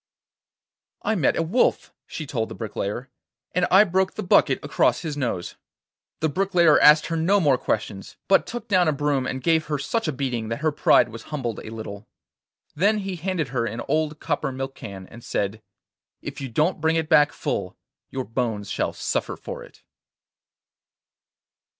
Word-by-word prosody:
'I 220 - +1
met 170 -11 +2
a - - +2
wolf,' 195 +10 +1
she 155 - -6
told 115 -5 -2
the - - -7
bricklayer, 115 +3 -4 0.4
'and 180 0 +2
I 195 +3 +7
broke 190 -1 0
the - - -4
bucket 180 - +4
across - - +2
his 155 -3 -3
nose.' 120 -11 -3 0.6
The 160 - +3
bricklayer 175 -1 +3
asked 150 +1 +7
her 165 - -2
no 180 +6 +3
more 140 -8 +3
questions, 100 -2 -3
but 195 - +4
took 240 +1 -6
down 185 -4 +3
a 155 - +3
broom 140 -2 0
and 130 -1 -4
gave 160 -2 +2
her 150 -1 -1
such 170 +10 -2
a - - +1
beating 125 -5 -3
that 115 +4 -4
her 155 0 +2
pride 145 - +4
was 115 +1 -10
humbled 130 -7 -3
a - - -8
little. 110 -2 -8 0.7
Then 205 +7 +2
he 195 -2 -3
handed 180 -1 -2
to 125 - -14
her 120 -2 0
an 115 - -5
old 155 +1 0
copper 145 -3 -1
milk 135 +1 -5
can, 95 -6 -9
and 115 +4 -13
said: 105 +2 -2 0.6
'If - - -7
you 135 - -4
don't 155 +8 0
bring 160 +1 +2
it 160 -1 0
back 150 -1 +5
full, - - -3 0.3
your 130 -1 -3
bones 110 -4 -3
shall - - -1
suffer - - -2
for - - -8
it. - - -17
145 Hz, 180 wpm, -24 LUFS, 120-165 Hz, 0.7 s, I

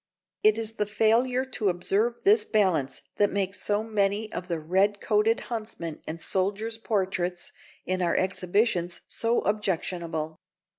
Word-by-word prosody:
It 215 0 +5
is 225 0 -3
the 210 - 0
failure 230 +5 +2
to 220 -6 0
observe 200 +7 0
this 415 +3 +5
balance 175 - +1
that 205 -1 +4
makes 195 0 -2
so 205 +1 0
many 215 0 0
of 180 - -5
the 170 -2 -2
red 190 +6 +2
coated 220 +1 +2
huntsmen 215 -9 -5
and 165 +1 -5
soldiers' 205 +6 -1
portraits 185 -5 -1 0.3
in 185 0 -1
our 175 - +1
exhibitions 185 -1 0
so 230 +1 +1
objectionable. 170 -6 -2
200 Hz, 140 wpm, -27 LUFS, 180-220 Hz, 0.3 s, It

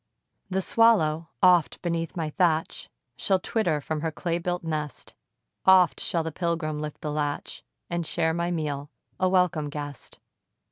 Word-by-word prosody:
The 190 0 0
swallow, 165 -10 +3
oft, 180 -4 +5
beneath 170 0 -2
my 160 -2 -2
thatch, 165 -3 0 0.3
Shall 190 +10 +2
twitter 180 -5 0
from 155 +1 -3
her 160 0 -1
clay 170 +2 -2
built 175 0 -2
nest; 155 -3 -4 0.5
Oft 185 -2 +6
shall 165 -2 -1
the 160 - -4
pilgrim 160 -2 -2
lift 150 -1 -6
the 150 - -3
latch, 145 -1 -3 0.2
And 170 0 -2
share 160 0 0
my 170 +1 -1
meal, 150 -4 -3 0.3
a 185 - +3
welcome 180 -5 +2
guest. 145 -2 -7
165 Hz, 150 wpm, -26 LUFS, 155-180 Hz, 0.5 s, Oft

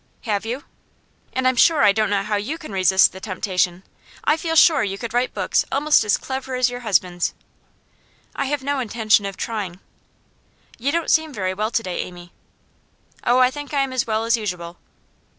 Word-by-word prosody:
'Have 210 -1 -2
you?' 250 +6 -4 0.7
'And 260 0 0
I'm 255 - +2
sure 305 +4 +4
I 205 - +7
don't 215 0 0
know 200 -1 +1
how 210 +1 -1
you 225 +11 -3
can 310 -7 -10
resist 190 0 +4
the 190 - -10
temptation. 185 -2 -1 0.4
I 300 - +3
feel 325 0 -3
sure 315 -6 +6
you 195 -1 -3
could 230 +1 -6
write 245 +1 0
books - - +1
almost 290 -1 +3
as 210 -1 +2
clever 265 -1 -5
as 250 0 +2
your 245 - -5
husband's.' 180 -6 0 1.0
'I 275 - -1
have 280 0 -2
no 285 0 -1
intention 220 -4 +2
of 195 -2 -7
trying.' 195 -3 -4 1.0
'You 270 +5 0
don't 335 +1 0
seem 315 -1 +2
very 185 -7 -2
well 215 +3 -1
to 230 0 -1
day, 180 -1 -4
Amy.' 175 -1 -10 0.9
'Oh, 245 - +4
I 255 0 +5
think 290 +1 -7
I 280 - +3
am 265 -1 -4
as 255 -2 -1
well 220 0 0
as 230 - +3
usual. 180 -6 -5
225 Hz, 195 wpm, -21 LUFS, 195-265 Hz, 1.0 s, I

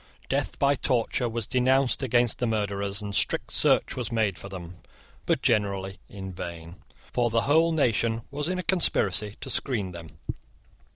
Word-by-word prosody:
Death - - -1
by 140 0 +4
torture 125 -2 +1
was 115 -1 -3
denounced 130 +2 +2
against 120 -2 +2
the 125 - +1
murderers, 100 -2 -1
and 100 -1 -4
strict - - 0
search - - +3
was - - -3
made 110 -4 +1
for 100 - -9
them, 90 -2 -8 0.5
but - - +1
generally 100 -4 +1
in 95 -5 -7
vain; 85 0 -7 0.4
for 120 -1 +2
the 115 0 +2
whole 160 +5 +4
nation 115 -6 +1
was 145 +2 -2
in 185 +1 -1
a 185 - -2
conspiracy 105 - +1
to - - -5
screen 105 -9 -1
them. 85 -2 -10
110 Hz, 165 wpm, -27 LUFS, 100-130 Hz, 0.5 s, by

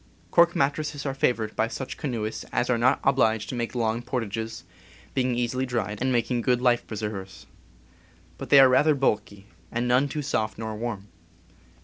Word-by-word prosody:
Cork 170 0 +5
mattresses 145 +1 -1
are 135 - -1
favored 115 -5 0
by 110 - +1
such 130 +3 -6
canoe 120 -7 -3
ists 110 - -5
as 120 +1 0
are 120 - +2
not 130 +3 +3
obliged 115 -5 +2
to - - -4
make 120 +1 -3
long 115 -1 0
portages, 115 -2 -4 0.5
being 125 -2 0
easily 125 +2 -1
dried, 115 -5 -2
and 130 +1 +1
making 120 0 0
good 125 0 +2
life 125 -1 +2
preservers. 105 -3 -6 0.9
But - - -7
they 140 - +8
are 135 - +9
rather 145 +4 +4
bulky, 105 -6 -1 0.3
and 120 +1 -1
none 130 +3 +3
too 150 0 -3
soft 110 -6 -1
nor 110 -1 -4
warm. 105 -3 -5
120 Hz, 175 wpm, -26 LUFS, 110-130 Hz, 0.9 s, are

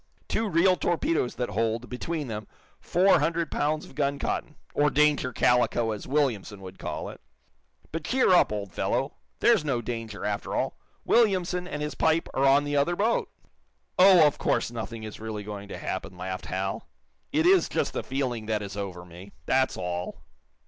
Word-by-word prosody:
Two 220 -1 -1
real 185 +1 +4
torpedoes 165 -7 0
that 125 -3 -2
hold, 115 +3 -1
between 150 +4 -4
them, 105 -2 -5 0.3
four 185 +3 +4
hundred 165 0 0
pounds 150 +1 0
of - - -15
gun 140 -1 0
cotton 150 - -3 0.2
or 150 0 +3
danger 150 -2 +2
calico, 120 -1 +2
as 105 -2 -6
Williamson 125 -8 0
would 95 0 -10
call - - -4
it. - - -10 0.7
But 165 0 -4
cheer 255 -5 +3
up, 180 - +5
old 100 -2 -4
fellow. - - -1 0.3
There's 230 -8 +5
no 135 -5 0
danger, 115 -3 -5
after 105 -1 -2
all. - - -1 0.3
Williamson 185 -5 +2
and 150 -4 -4
his 150 - -3
pipe 160 +1 +1
are 135 - +2
on 140 +2 +5
the 145 0 -2
other 145 +5 +2
boat." 220 +5 +1 0.7
"Oh, 185 -4 +8
of 145 - +1
course - - 0
nothing 115 -1 -6
is 110 -1 -8
really 110 -1 -5
going 100 -1 -7
to - - -7
happen," 90 - -5
laughed 95 +1 -5
Hal. 95 +1 -3 0.4
"It 155 +3 +2
is 185 -1 +5
just - - -1
the - - -2
feeling 125 -5 -3
that 105 -2 -1
is 100 -1 -7
over 95 -3 -5
me. 90 +3 -12
That's 130 0 +2
all." 90 -1 -4
130 Hz, 180 wpm, -27 LUFS, 105-160 Hz, 0.7 s, Oh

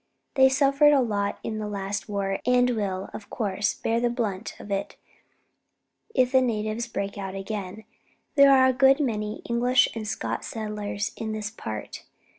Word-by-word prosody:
They 265 -1 +6
suffered 275 +2 +4
a 280 - +5
lot 205 -5 -1
in 215 -1 -3
the 210 - -3
last 200 0 -4
war, 195 -1 -1
and 250 0 +3
will, 195 -4 -3
of 205 - -9
course, 205 -3 -1
bear 230 +1 0
the 240 0 +1
brunt 220 -6 -3
of 205 - -9
it 195 0 -2 1.2
if 255 -1 +3
the 260 -1 +5
natives 220 -1 -1
break 200 -3 -4
out 195 -1 -5
again. 195 +1 -5 0.5
There 280 -1 +7
are 260 -1 +6
a 260 - +4
good 270 +2 +5
many 215 -6 -2
English 245 +2 +3
and 220 -1 -4
Scotch 115 - -3
settlers 210 -2 -4
in 220 -1 -3
this 210 -1 -4
part. 110 - -7
215 Hz, 170 wpm, -26 LUFS, 200-250 Hz, 1.2 s, There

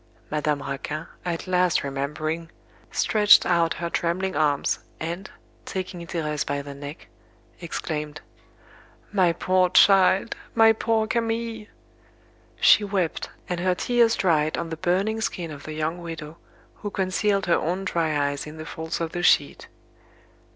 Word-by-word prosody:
Madame 150 -1 0
Raquin, 150 +3 -4 0.2
at 170 -2 -3
last 180 -2 +2
remembering, 150 +4 -3 0.4
stretched 210 -2 +5
out 170 -2 +2
her 170 - -3
trembling 175 +3 -1
arms, 145 -2 +1 0.2
and, 170 +4 -5 0.3
taking 185 -2 -5
Thérèse 150 -3 -2
by 145 0 -3
the 140 0 -8
neck, 145 +3 -9 0.5
exclaimed: 150 -3 -4 0.9
"My 185 -4 +4
poor 185 +1 +2
child, 195 +3 +5 0.2
my 225 -1 +7
poor 220 0 +1
Camille!" 225 -1 -2 0.9
She - - +6
wept, 195 -5 -1 0.2
and 180 -1 -2
her 180 +1 +1
tears 235 +2 +3
dried 155 -4 +1
on 165 -1 -4
the - - -2
burning 195 +7 0
skin 175 -7 -3
of 145 -1 -10
the 155 - -6
young 155 +3 -2
widow, 165 -2 -8 0.4
who 205 - -5
concealed 195 +1 0
her 175 - +2
own 180 +4 -2
dry 155 -5 +1
eyes 145 +1 -6
in 155 +1 -9
the 155 - -7
folds 160 +1 -5
of 165 -1 -2
the 175 - -3
sheet. 145 -4 +2
170 Hz, 145 wpm, -25 LUFS, 155-190 Hz, 0.9 s, my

